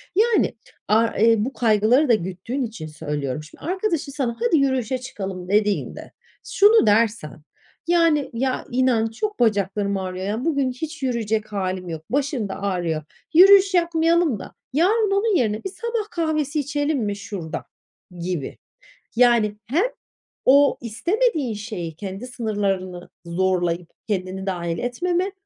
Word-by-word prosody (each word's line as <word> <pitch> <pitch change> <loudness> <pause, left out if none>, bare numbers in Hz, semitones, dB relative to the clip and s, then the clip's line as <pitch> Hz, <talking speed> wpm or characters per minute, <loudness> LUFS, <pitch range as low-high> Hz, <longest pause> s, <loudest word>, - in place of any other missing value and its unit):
Yani, 445 +1 +3 0.3
a 220 +2 +4
e 225 -1 +4
bu 270 - -4
kaygıları 235 +5 +3
da - - +6
güttüğün 190 +7 -2
için 215 -10 -6
söylüyorum. 150 -2 -4
Şimdi 155 - -16
arkadaşın 355 -4 -1
sana 250 -5 -2
"Hadi, 240 +7 +3
yürüyüşe 260 -3 +1
çıkalım." 190 -7 -6
dediğinde 205 0 0 0.3
şunu 415 - +5
dersen 205 - +1 0.5
yani, 330 -4 +3
"Ya, 255 +2 -1
inan 245 -3 +2
çok 415 - -4
bacaklarım 200 -3 +1
ağrıyor 185 0 -4
ya, 220 +6 -2
bugün 280 -5 +1
hiç 305 +3 -7
yürüyecek 220 -4 -1
hâlim 185 -2 -3
yok, 160 -1 -6
başım 275 -6 -1
da 195 - -6
ağrıyor, 175 -6 -1 0.3
yürüyüş 385 +3 +7
yapmayalım 335 - +2
da - - -10 0.2
yarın 400 - +2
onun 405 +1 +2
yerine 215 -8 0
bir 385 - -3
sabah 460 -1 -3
kahvesi 310 -3 -1
içelim 290 +1 -1
mi 205 -1 -2
şurada?" 180 -5 -6 0.5
gibi. 170 -5 -4 0.6
Yani, 235 -3 +4
hem 310 - +1 0.6
o 280 +2 +5
istemediğin 310 - 0
şeyi 205 -7 -6
kendi 195 +6 -7
sınırlarını 200 -7 -3 0.2
zorlayıp 175 -1 0 0.2
kendini 190 -2 -3
dâhil 170 -3 -2
etmeme 350 +10 -1
230 Hz, 135 wpm, -22 LUFS, 190-300 Hz, 0.6 s, yürüyüş